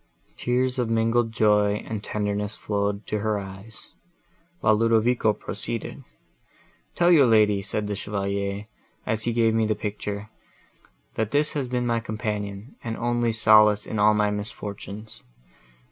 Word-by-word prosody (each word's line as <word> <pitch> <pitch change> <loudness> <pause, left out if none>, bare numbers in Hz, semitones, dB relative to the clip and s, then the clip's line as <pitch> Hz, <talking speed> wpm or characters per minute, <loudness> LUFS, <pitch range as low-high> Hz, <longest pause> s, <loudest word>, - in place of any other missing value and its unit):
Tears 125 +1 0
of 120 -2 0
mingled 115 +1 +1
joy 105 -2 +3
and 110 -2 -4
tenderness 105 0 -2
flowed 100 0 -2
to 105 - -2
her 105 0 0
eyes, 100 +3 -9 0.7
while 110 0 +4
Ludovico 115 +1 +3
proceeded—"'Tell 105 - -5
your 145 -7 +6
lady,' 105 -3 +4
said 105 +1 -3
the 105 0 -3
Chevalier, 100 0 -3 0.4
as 110 0 -1
he 120 - +1
gave 115 -1 +2
me 110 -1 +2
the 110 - +1
picture, 105 0 -5 0.8
'that 110 -1 -1
this 150 +3 +1
has 140 -4 -2
been 125 0 -1
my 115 -1 +1
companion, 105 0 -5
and 115 -1 -4
only 120 0 0
solace 110 -1 +5
in 110 - -4
all 105 +1 +5
my 105 -1 +2
misfortunes. 105 +1 -7
110 Hz, 140 wpm, -25 LUFS, 105-115 Hz, 0.8 s, your